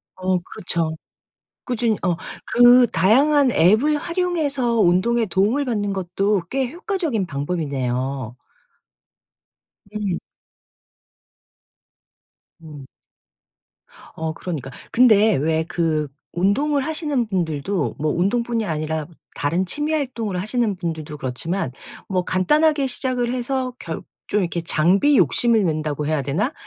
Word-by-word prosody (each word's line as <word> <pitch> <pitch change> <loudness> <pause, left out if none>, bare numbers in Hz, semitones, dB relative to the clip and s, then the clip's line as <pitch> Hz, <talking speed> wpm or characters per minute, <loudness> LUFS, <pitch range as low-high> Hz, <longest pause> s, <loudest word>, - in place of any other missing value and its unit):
어 185 0 0
그렇죠 165 -2 -2 0.7
꾸준히. 235 -4 0
어 180 -3 +1 0.4
그 245 0 +7
다양한 270 - +4
앱을 220 - +4
활용해서 300 -9 0
운동에 220 +6 +3
도움을 210 +9 +1
받는 210 -6 -1
것도 190 +2 0
꽤 265 -2 -1
효과적인 330 - -2
방법이네요. 135 -5 -3 1.6
음. 200 -5 -2 2.4
음. 150 -4 -11 1.3
어 160 0 -3
그러니까. 150 -7 -6 0.2
근데 220 -3 +5
왜 160 +3 0
그 155 -4 0 0.3
운동을 275 +11 +1
하시는 295 -6 0
분들도 175 -1 -2
뭐 155 0 0
운동뿐이 230 +5 0
아니라 155 -2 -2 0.3
다른 170 +6 0
취미 295 - 0
활동을 235 -10 -2
하시는 215 0 0
분들도 160 -4 -5
그렇지만 135 +4 -3 0.4
뭐 185 -2 0
간단하게 295 - +2
시작을 250 -1 0
해서 255 0 -2
결 165 -1 -6 0.3
좀 210 - +1
이렇게 175 -3 -2
장비 185 - +3
욕심을 230 -4 +3
낸다고 155 -2 -2
해야 155 -2 0
되나? 180 - -1
195 Hz, 250 characters per minute, -21 LUFS, 160-250 Hz, 2.4 s, 그